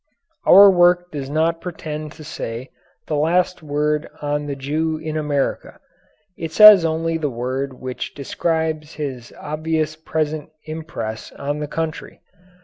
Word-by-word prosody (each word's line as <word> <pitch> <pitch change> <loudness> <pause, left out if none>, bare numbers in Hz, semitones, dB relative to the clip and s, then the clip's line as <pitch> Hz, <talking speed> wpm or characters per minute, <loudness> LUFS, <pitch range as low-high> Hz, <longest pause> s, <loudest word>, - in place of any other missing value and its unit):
Our 200 +2 +10
work 175 0 +3
does 140 -3 -5
not 165 +2 0
pretend 155 -3 -6
to 155 - -12
say 125 -4 -6 0.3
the 155 - -2
last 175 +4 +1
word 150 0 -1
on 145 0 -2
the 140 - -3
Jew 155 +4 -1
in 155 0 -5
America. 145 -3 -2 0.6
It 165 -1 -5
says 210 0 +9
only 165 0 0
the 150 -2 -1
word 130 +3 -3
which 130 0 -6
describes 160 +1 -2
his 130 -6 -5
obvious 155 0 -2
present 155 -1 -3 0.2
impress 155 -9 -6
on 145 +1 -4
the 150 - -3
country. 160 +1 -5
155 Hz, 140 wpm, -21 LUFS, 145-160 Hz, 0.6 s, Our